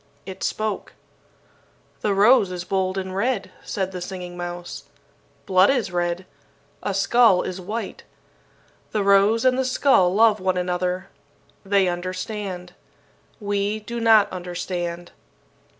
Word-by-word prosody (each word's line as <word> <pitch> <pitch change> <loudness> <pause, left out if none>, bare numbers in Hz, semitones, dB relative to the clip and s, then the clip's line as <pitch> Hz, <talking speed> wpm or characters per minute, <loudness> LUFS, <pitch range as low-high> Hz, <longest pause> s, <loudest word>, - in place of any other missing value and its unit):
It 190 -1 -9
spoke: 215 -2 -3 1.1
"The 205 -2 0
rose 205 -1 +5
is 180 -1 -4
bold 185 0 -1
and 190 -1 -4
red," 230 +1 -1
said 190 -1 -3
the 180 -1 -6
Singing 180 -1 -6
Mouse. 175 0 -6 0.6
"Blood 185 0 +5
is 245 -8 +1
red. 175 +1 -1 0.6
A 200 - -2
skull 195 0 +4
is 185 0 -5
white. 215 +5 -5 0.9
The 210 -2 +1
rose 200 +4 +4
and 255 0 +3
the - - +2
skull 255 -8 +3
love 215 +2 +4
one 185 -1 0
another. 180 +1 -2 0.5
They 195 -1 +2
understand. 185 +1 -4 0.7
We 205 0 -1
do 235 +2 -5
not 225 -3 +5
understand. 175 -1 -5
190 Hz, 125 wpm, -23 LUFS, 180-210 Hz, 1.1 s, rose